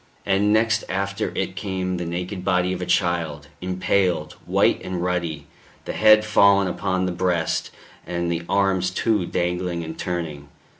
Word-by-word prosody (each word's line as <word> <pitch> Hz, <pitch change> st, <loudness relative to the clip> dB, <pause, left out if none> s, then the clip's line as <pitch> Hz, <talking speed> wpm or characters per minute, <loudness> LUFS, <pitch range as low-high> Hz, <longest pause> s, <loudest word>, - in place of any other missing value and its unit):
And 100 Hz, +1 st, +2 dB
next 110 Hz, 0 st, +2 dB
after 100 Hz, +1 st, -2 dB
it 95 Hz, -, -2 dB
came 95 Hz, 0 st, -2 dB
the 85 Hz, -1 st, -4 dB
naked 90 Hz, +2 st, -4 dB
body 90 Hz, -1 st, +1 dB
of 90 Hz, -, -5 dB
a 90 Hz, -, -4 dB
child, 80 Hz, -5 st, 0 dB
impaled, 90 Hz, -3 st, 0 dB
white -, -, +3 dB
and 95 Hz, -1 st, -4 dB
ruddy, 85 Hz, -5 st, -2 dB, 0.4 s
the -, -, -4 dB
head 110 Hz, 0 st, +6 dB
fallen 100 Hz, -2 st, +5 dB
upon 95 Hz, +1 st, -1 dB
the 90 Hz, -, -1 dB
breast, 90 Hz, -2 st, 0 dB, 0.4 s
and 85 Hz, -1 st, -2 dB
the 85 Hz, 0 st, -1 dB
arms, 95 Hz, -2 st, +2 dB
too, 95 Hz, -1 st, 0 dB
dangling 90 Hz, -1 st, -1 dB
and 80 Hz, 0 st, -6 dB
turning. 80 Hz, -5 st, -4 dB
90 Hz, 155 wpm, -23 LUFS, 85-95 Hz, 0.4 s, head